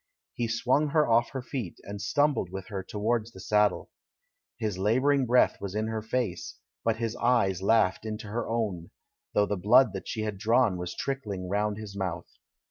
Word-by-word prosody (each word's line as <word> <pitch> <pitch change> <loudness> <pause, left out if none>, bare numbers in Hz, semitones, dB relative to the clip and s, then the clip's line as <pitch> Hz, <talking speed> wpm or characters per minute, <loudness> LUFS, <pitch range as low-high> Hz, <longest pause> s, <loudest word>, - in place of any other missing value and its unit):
He 120 - -2
swung 125 +6 +1
her 150 +1 +2
off 115 0 +3
her 130 -2 -5
feet, 120 - -5
and 100 0 -7
stumbled 145 - +1
with 95 +3 -7
her 100 -3 -3
towards 110 +4 -2
the 95 - -11
saddle. 105 +1 +1 0.7
His 105 -5 -3
labouring 130 +6 +2
breath 125 +2 +3
was 100 0 -5
in 110 +1 -1
her 110 -1 -2
face, 110 -4 -3 0.3
but 115 -1 +2
his 115 -1 -2
eyes 105 -7 +2
laughed 100 -2 +3
into 110 0 -5
her 110 +3 -3
own, 105 -7 -2 0.5
though 105 - +4
the 105 - -2
blood 110 +5 +5
that 95 - -6
she 110 - -3
had 105 -3 -4
drawn 115 -2 +3
was 90 0 -5
trickling 105 -10 -4
round 105 +1 0
his 105 -2 -8
mouth. 95 -4 -3
110 Hz, 185 wpm, -28 LUFS, 100-120 Hz, 0.7 s, blood